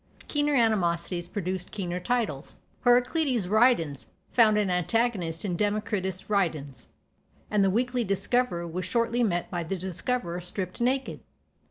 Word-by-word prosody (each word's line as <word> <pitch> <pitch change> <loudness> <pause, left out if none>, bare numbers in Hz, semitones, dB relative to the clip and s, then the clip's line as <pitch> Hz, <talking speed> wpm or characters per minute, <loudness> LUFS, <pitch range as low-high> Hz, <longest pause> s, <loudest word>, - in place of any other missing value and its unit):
Keener 295 -1 +1
animosities 175 -7 +1
produced 185 -1 -4
keener 180 -3 -3
titles: 210 - -2 0.3
"Heraclitus 245 - +3
ridens" 195 - +2 0.2
found 220 -3 +5
an 205 -3 +1
antagonist 180 -2 0
in 180 -3 -1
"Democritus 205 -2 -1
ridens," 155 - -1 0.6
and 210 -2 +3
"The 195 - +4
Weekly 245 +4 +1
Discoverer" 200 -2 0
was 180 +3 -4
shortly 235 +2 0
met 175 -6 -1
by 175 -2 -2
"The 185 +4 -3
Discoverer 180 0 -2
stript 180 +3 -5
naked." 260 +2 0
200 Hz, 130 wpm, -27 LUFS, 175-235 Hz, 0.6 s, found